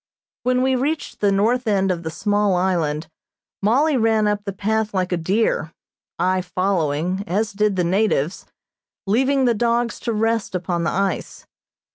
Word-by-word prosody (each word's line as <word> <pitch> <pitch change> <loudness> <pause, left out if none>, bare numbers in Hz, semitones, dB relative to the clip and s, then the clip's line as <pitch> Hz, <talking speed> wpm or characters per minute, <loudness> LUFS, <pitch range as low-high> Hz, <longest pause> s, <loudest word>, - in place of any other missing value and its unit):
When 255 +1 +1
we 260 0 +2
reached 295 +5 -2
the 205 -1 +2
north 230 +5 +1
end 195 -2 +2
of 175 -2 -2
the 160 - -4
small 205 +2 +1
island 170 -4 0 0.5
Mollie 270 +8 +3
ran 220 -2 +2
up 205 0 -1
the 200 - -2
path 215 +2 -1
like 185 -1 0
a - - +2
deer, 170 -2 0 0.4
I 185 0 +1
following, 180 -1 -1
as 205 +4 -1
did 210 0 +1
the 180 - +1
natives, 180 -3 0 0.6
leaving 265 +6 +2
the 240 - +3
dogs 235 +1 0
to 235 - -2
rest 225 -2 0
upon 175 -1 -1
the - - +2
ice. 195 +1 -2
200 Hz, 160 wpm, -21 LUFS, 185-225 Hz, 0.6 s, Mollie